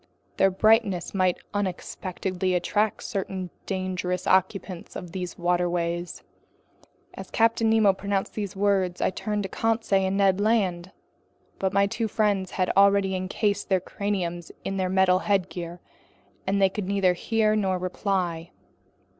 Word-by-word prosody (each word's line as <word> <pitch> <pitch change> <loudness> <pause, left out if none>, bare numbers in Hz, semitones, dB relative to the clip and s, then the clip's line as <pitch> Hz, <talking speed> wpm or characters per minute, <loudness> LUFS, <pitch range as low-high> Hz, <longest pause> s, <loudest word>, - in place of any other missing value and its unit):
Their 195 - +5
brightness 205 -2 +2
might 185 -2 +2 0.2
unexpectedly 185 -1 -2
attract 205 +4 0
certain 190 -2 -4 0.2
dangerous 185 -1 -2
occupants 190 -1 0
of 175 - -7
these 180 -1 -5
waterways." 175 0 -1 0.9
As - - -9
Captain 225 0 +2
Nemo 220 -3 +5
pronounced 195 0 -2
these 205 -3 -4
words, 190 -3 +1
I - - +1
turned 210 +2 -2
to 195 - -4
Conseil 220 -4 +1
and 190 +1 -1
Ned 195 -1 +3
Land. 190 -5 +1 0.7
But 190 -1 0
my 200 0 +3
two 225 +2 -2
friends 205 -3 0
had 185 -1 +1
already 200 -1 +4
encased 200 +3 -1
their 190 -1 +3
craniums 180 -3 -3
in 195 - -2
their 185 -1 0
metal 185 -1 +4
headgear, 180 -3 -2 0.7
and 200 +1 +1
they 195 -1 +5
could 195 0 -4
neither 195 -2 +2
hear 215 +3 +1
nor 190 -3 +1
reply. 180 -2 -2
190 Hz, 140 wpm, -26 LUFS, 180-200 Hz, 0.9 s, Their